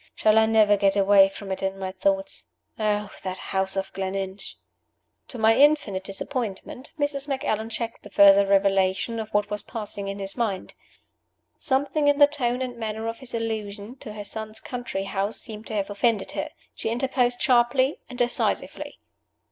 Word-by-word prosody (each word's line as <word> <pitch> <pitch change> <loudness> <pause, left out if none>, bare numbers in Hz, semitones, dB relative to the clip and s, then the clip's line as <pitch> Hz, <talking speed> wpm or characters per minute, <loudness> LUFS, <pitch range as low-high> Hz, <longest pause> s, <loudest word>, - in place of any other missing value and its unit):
"Shall 215 0 +4
I 220 - +4
never 215 -2 +5
get 195 0 +2
away 195 -1 +6
from 195 0 -8
it 190 - -3
in 195 0 -2
my 190 -1 -4
thoughts? 195 +1 -1 0.3
Oh, 210 -1 0
that 185 0 -4
house 190 0 -2
of 195 - -3
Gleninch!" 190 0 -4 0.7
To 250 - -6
my 225 0 +4
infinite 280 -10 +3
disappointment, 230 +5 -5
Mrs. 285 -1 -1
Macallan 225 -5 -1
checked 230 0 -4
the 205 - -12
further 200 0 +7
revelation 195 +2 +2
of 220 -1 -5
what 210 0 0
was 210 -1 -2
passing 205 -3 -5
in 195 0 -4
his 195 -1 -1
mind. 215 -6 -2 0.9
Something 285 +1 +1
in 290 0 +4
the 290 - +9
tone 260 -4 -1
and 245 -2 -5
manner 220 0 -4
of 230 0 -4
his 260 -2 -7
allusion 220 0 -4
to 215 - -9
her 210 -1 -6
son's 220 +1 -5
country 245 -5 -4
house 195 +2 -2
seemed 220 -2 -9
to 220 - -5
have 200 0 -1
offended 205 0 0
her. - - -3 0.2
She - - -3
interposed 245 0 0
sharply 255 +2 +3
and 250 - -8
decisively. 245 -1 -1
215 Hz, 170 wpm, -25 LUFS, 195-245 Hz, 0.9 s, the